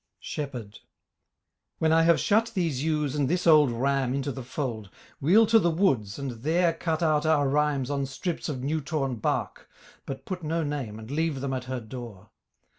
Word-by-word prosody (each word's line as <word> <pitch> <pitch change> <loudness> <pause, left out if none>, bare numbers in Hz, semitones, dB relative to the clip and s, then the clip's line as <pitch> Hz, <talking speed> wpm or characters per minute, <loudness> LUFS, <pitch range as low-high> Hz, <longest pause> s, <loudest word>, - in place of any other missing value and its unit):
SHEPHERD 125 -8 -6 1.0
When 160 0 +2
I 165 - +5
have 165 0 +4
shut 225 +3 +2
these 160 -8 0
ewes 150 -3 0
and 145 -3 0
this 180 +2 0
old 155 -4 +6
ram 135 +1 0
Into 140 +1 -2
the 130 - -6
fold, 120 -5 -4 0.3
we'll 195 +11 +5
to 225 +1 +5
the 170 - +2
woods 135 - +1
and 130 -5 -5
there 165 +4 +2
Cut 165 0 -2
out 155 -2 +2
our 155 -3 +3
rhymes 145 -1 +1
on 140 -1 -1
strips 165 +6 -4
of 130 -4 -4
new 155 +3 -1
torn 135 -4 -2
bark 105 - -2 0.4
But 135 - -6
put 185 -2 -4
no 165 +1 -1
name 140 -8 -4
and 110 +3 -9
leave 155 -1 0
them 135 0 -3
at 130 -1 -3
her 130 0 -3
door. 110 -4 -9
145 Hz, 190 wpm, -27 LUFS, 130-160 Hz, 1.0 s, old